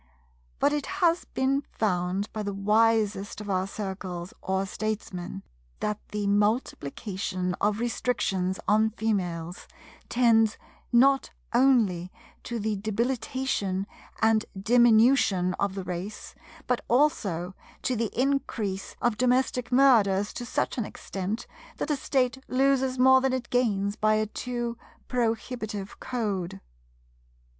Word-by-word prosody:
But 290 Hz, -, +2 dB
it 295 Hz, -1 st, -2 dB
has 345 Hz, -2 st, +1 dB
been 270 Hz, +1 st, 0 dB
found 185 Hz, -1 st, -1 dB
by 215 Hz, -, -3 dB
the 200 Hz, -1 st, -3 dB
wisest 210 Hz, -1 st, +2 dB
of 205 Hz, -1 st, -5 dB
our 185 Hz, 0 st, 0 dB
Circles 190 Hz, -3 st, -5 dB
or 190 Hz, 0 st, -1 dB
Statesmen 195 Hz, -, -4 dB, 0.4 s
that 210 Hz, 0 st, -2 dB
the 210 Hz, -1 st, -3 dB
multiplication 200 Hz, -, -1 dB
of 210 Hz, +1 st, +1 dB
restrictions 195 Hz, -6 st, -1 dB
on 215 Hz, +1 st, +4 dB
Females 180 Hz, -6 st, -3 dB, 0.4 s
tends 225 Hz, -3 st, +4 dB, 0.3 s
not 270 Hz, +3 st, +4 dB, 0.2 s
only 225 Hz, -9 st, +3 dB, 0.3 s
to 240 Hz, -, -3 dB
the 215 Hz, -1 st, -1 dB
debilitation 220 Hz, -2 st, -1 dB, 0.4 s
and 220 Hz, 0 st, +4 dB, 0.2 s
diminution 225 Hz, -4 st, +4 dB
of 200 Hz, -1 st, 0 dB
the 195 Hz, -, -4 dB
race, 185 Hz, +4 st, -6 dB, 0.3 s
but 250 Hz, -, 0 dB
also 205 Hz, -, +1 dB, 0.3 s
to 255 Hz, -, 0 dB
the 225 Hz, -1 st, -1 dB
increase 245 Hz, -8 st, -1 dB
of 240 Hz, -3 st, +2 dB
domestic 255 Hz, 0 st, +1 dB
murders 215 Hz, -7 st, +4 dB
to 240 Hz, -, -6 dB
such 250 Hz, -, -1 dB
an -, -, +1 dB
extent 195 Hz, +3 st, -5 dB, 0.3 s
that 300 Hz, -, -2 dB
a -, -, +3 dB
State 265 Hz, -2 st, 0 dB
loses 265 Hz, 0 st, +2 dB
more 260 Hz, +1 st, +6 dB
than 265 Hz, 0 st, +1 dB
it 255 Hz, -2 st, -3 dB
gains 205 Hz, -5 st, +1 dB
by 215 Hz, 0 st, +3 dB
a 215 Hz, 0 st, +1 dB
too 240 Hz, +1 st, -4 dB, 0.3 s
prohibitive 225 Hz, -4 st, -2 dB
Code. 200 Hz, -, -3 dB
215 Hz, 120 wpm, -27 LUFS, 195-250 Hz, 0.4 s, more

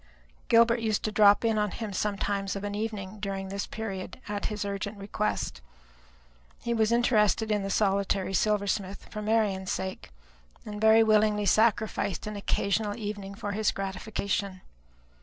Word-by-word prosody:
Gilbert 235 Hz, +1 st, +5 dB
used 220 Hz, -2 st, 0 dB
to 215 Hz, -, -1 dB
drop 205 Hz, +1 st, +5 dB
in 220 Hz, -1 st, +2 dB
upon 210 Hz, 0 st, +1 dB
him 215 Hz, +1 st, -5 dB
sometimes 200 Hz, 0 st, -1 dB
of 200 Hz, -, -5 dB
an 205 Hz, 0 st, -3 dB
evening 210 Hz, -1 st, -4 dB
during 195 Hz, -1 st, -4 dB
this 200 Hz, +1 st, -3 dB
period, 195 Hz, -2 st, -6 dB
at 205 Hz, -1 st, -3 dB
his 210 Hz, -1 st, -3 dB
urgent 200 Hz, +1 st, -4 dB
request. 210 Hz, +2 st, -2 dB, 1.0 s
He 235 Hz, -, -2 dB
was 220 Hz, -1 st, +2 dB
interested 220 Hz, -2 st, +3 dB
in 210 Hz, -1 st, +1 dB
the 195 Hz, -, -3 dB
solitary 195 Hz, -1 st, +1 dB
silversmith 200 Hz, -1 st, 0 dB
for 215 Hz, -, -5 dB
Marian's 210 Hz, -3 st, +1 dB
sake, 190 Hz, 0 st, -4 dB, 0.6 s
and 210 Hz, 0 st, -6 dB
very 220 Hz, +1 st, +7 dB
willingly 215 Hz, -1 st, +3 dB
sacrificed 215 Hz, -2 st, +2 dB
an 210 Hz, 0 st, -5 dB
occasional 205 Hz, +1 st, -1 dB
evening 205 Hz, -2 st, -5 dB
for 205 Hz, -1 st, -4 dB
his 215 Hz, 0 st, +1 dB
gratification. 195 Hz, 0 st, -3 dB
205 Hz, 150 wpm, -28 LUFS, 195-215 Hz, 1.0 s, very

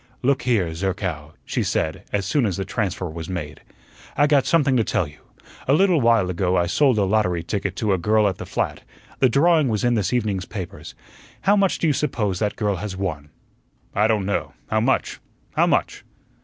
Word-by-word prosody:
"Look 135 Hz, +1 st, +2 dB
here, 105 Hz, -10 st, +1 dB
Zerkow," 90 Hz, -4 st, -3 dB
she -, -, -1 dB
said 80 Hz, -1 st, -2 dB
as 100 Hz, -2 st, -1 dB
soon 120 Hz, -, +1 dB
as 95 Hz, -, -2 dB
the 95 Hz, -, -3 dB
transfer 95 Hz, -2 st, -2 dB
was 80 Hz, +1 st, -7 dB
made, 80 Hz, -5 st, -5 dB, 0.6 s
"I 145 Hz, -, +5 dB
got 145 Hz, -3 st, +3 dB
something 145 Hz, -5 st, +3 dB
to 115 Hz, -, +3 dB
tell 105 Hz, -6 st, 0 dB
you. 75 Hz, +1 st, -16 dB, 0.5 s
A 135 Hz, -, +4 dB
little 180 Hz, -1 st, +4 dB
while 115 Hz, -6 st, +3 dB
ago 90 Hz, +1 st, 0 dB
I 85 Hz, -, +2 dB
sold 130 Hz, -, +2 dB
a 105 Hz, -, +3 dB
lottery 95 Hz, -4 st, +1 dB
ticket 95 Hz, +1 st, -3 dB
to 105 Hz, 0 st, 0 dB
a 95 Hz, -, 0 dB
girl 105 Hz, +3 st, +3 dB
at 95 Hz, -, -2 dB
the -, -, -7 dB
flat; -, -, -2 dB, 0.4 s
the 130 Hz, -, +5 dB
drawing 155 Hz, +3 st, +4 dB
was 110 Hz, -4 st, -1 dB
in 120 Hz, 0 st, +3 dB
this 105 Hz, -5 st, 0 dB
evening's 105 Hz, -7 st, -1 dB
papers. 95 Hz, -6 st, -8 dB, 0.5 s
How 200 Hz, -, +4 dB
much 195 Hz, -2 st, +2 dB
do -, -, -2 dB
you 155 Hz, -, +3 dB
suppose 105 Hz, -10 st, -1 dB
that 105 Hz, -1 st, -1 dB
girl 105 Hz, -3 st, -1 dB
has 95 Hz, 0 st, -5 dB
won?" 75 Hz, -7 st, -4 dB, 0.6 s
"I 105 Hz, +2 st, +3 dB
don't 110 Hz, -3 st, +1 dB
know. 100 Hz, -, -2 dB, 0.2 s
How 110 Hz, -, +3 dB
much? 130 Hz, +3 st, 0 dB, 0.4 s
How -, -, +4 dB
much?" -, -, 0 dB
105 Hz, 205 wpm, -22 LUFS, 90-125 Hz, 0.6 s, I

